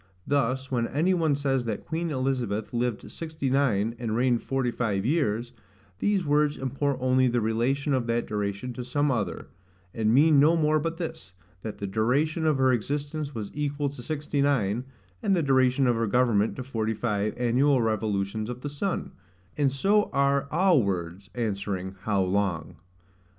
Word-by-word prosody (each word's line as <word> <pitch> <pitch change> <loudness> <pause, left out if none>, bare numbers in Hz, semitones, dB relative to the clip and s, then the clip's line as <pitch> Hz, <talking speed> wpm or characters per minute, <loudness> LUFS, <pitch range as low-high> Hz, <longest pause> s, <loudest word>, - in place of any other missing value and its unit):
Thus, 135 -1 0
when 120 -2 +1
any 165 +7 +1
one 160 -5 +2
says 135 -3 0
that 110 -3 -4
Queen 165 +1 -2
Elizabeth 125 -7 -2
lived 120 -2 -2
sixty 155 -5 -4
nine, 115 -5 +1
and 115 -3 -2
reigned 120 0 +2
forty 135 -2 -1
five 105 -5 -1
years, 120 -5 0 0.5
these 200 -4 +1
words 150 0 +2
import 135 +1 -1
only 130 0 +3
the 120 0 +1
relation 120 +6 0
of 125 -3 0
that 115 0 0
duration 105 +3 -3
to 125 - -5
some 145 +3 0
other, 105 -9 -3 0.4
and 110 -1 +1
mean 145 +4 +5
no 160 +4 +5
more 155 -1 +3
but 165 +2 -3
this, 100 - -6 0.3
That 110 +1 -6
the 100 - -4
duration 140 - +1
of 150 -3 +3
her 130 -1 +4
existence 145 +4 -3
was 105 -3 -5
equal 145 -1 -1
to 135 -2 -9
sixty 150 +1 -2
nine, 125 -5 +1 0.4
and 195 - +2
the 170 - +1
duration 130 -1 +3
of 120 -1 +3
her 115 0 0
government 115 -2 +2
to 130 - -5
forty 110 -4 -2
five 105 -2 -1
annual 125 +3 +3
revolutions 110 -1 -1
of 125 0 -6
the 145 - -4
sun; 160 +7 -3 0.4
and 140 -2 +2
so 200 +10 +2
are 140 0 +2
all 175 -3 +4
words, 95 -1 -3
answering, 100 -5 -2
HOW 100 -3 +2
LONG? 95 -4 -1
130 Hz, 170 wpm, -27 LUFS, 110-145 Hz, 0.5 s, mean